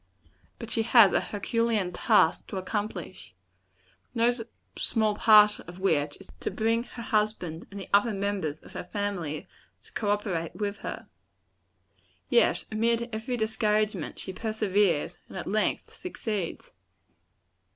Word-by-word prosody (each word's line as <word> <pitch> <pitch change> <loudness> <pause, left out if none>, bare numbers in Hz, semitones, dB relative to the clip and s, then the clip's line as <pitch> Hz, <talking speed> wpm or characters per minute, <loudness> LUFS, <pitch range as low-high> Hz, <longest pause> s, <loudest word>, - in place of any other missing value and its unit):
But 230 -2 -8
she 225 - +1
has 225 -3 +6
a - - +4
herculean 215 -2 -1
task 160 - +3
to 195 - -5
accomplish 190 - -5 0.8
no 235 +1 +4 0.4
small 215 -2 +2
part 210 -1 +6
of 175 - -10
which 150 -6 +1
is, 195 - -14
to - - -2
bring 225 +1 +1
her 235 - -9
husband 210 -8 -1
and 200 - -8
the 190 - -7
other 205 +3 +5
members 195 -7 -2
of - - -15
her - - -5
family 180 -6 -3 0.4
to - - -14
co 210 - -1
operate 195 -6 -1
with 205 -1 -2
her. - - -6 1.2
Yet, 475 - +3
amid 230 +2 0
every 220 +3 -3
discouragement, 215 -1 0
she 190 - -4
perseveres, 205 -6 0
and - - -8
at 185 - -4
length 215 +2 -1
succeeds. 215 - -4
210 Hz, 135 wpm, -28 LUFS, 190-220 Hz, 1.2 s, has